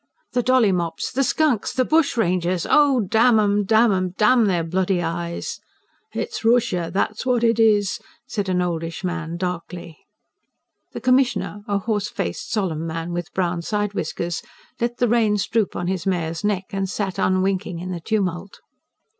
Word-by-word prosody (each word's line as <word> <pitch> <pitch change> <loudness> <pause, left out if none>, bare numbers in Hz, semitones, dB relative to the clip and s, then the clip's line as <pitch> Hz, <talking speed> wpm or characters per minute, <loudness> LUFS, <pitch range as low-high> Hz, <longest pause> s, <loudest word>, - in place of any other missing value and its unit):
"The 245 - +2
dolly 250 -4 +4
mops! 170 -3 -2
The 270 +2 +1
skunks! 280 -5 +1
The 255 - +1
bushrangers! 185 - +1
Oh, 285 -4 +4
damn 220 +3 +4
'em, 205 0 +2
damn 220 +2 +4
'em!... 185 -1 -1
damn 225 +1 +4
their 175 -4 +1
bloody 185 +2 0
eyes!" 170 0 -4 0.5
"It's 460 - -4
Rooshia 225 -8 +2
that's 210 +3 -1
what 250 -2 +1
it 230 -1 +3
is!" 210 -3 +3 0.3
said 200 -2 -3
an 180 -1 +1
oldish 165 0 -3
man 170 -2 -3
darkly. 175 -2 -5 0.9
The - - -6
Commissioner, 245 -6 +1
a 205 - +1
horse 210 0 -1
faced, 85 - -4
solemn 175 -7 -1
man 165 +1 -4
with 175 -1 -4
brown 175 -2 0
side 205 +3 -2
whiskers, 170 -4 -3 0.4
let 240 +1 -1
the 245 - +2
reins 215 -4 +2
droop 220 -3 0
on 175 - -3
his 185 -1 -2
mare's 165 -2 -1
neck 200 -2 0
and 195 -1 -2
sat 195 0 -3
unwinking 185 -1 0
in 180 +2 -5
the 175 - -4
tumult. 190 -1 -2
195 Hz, 165 wpm, -22 LUFS, 175-225 Hz, 0.9 s, dolly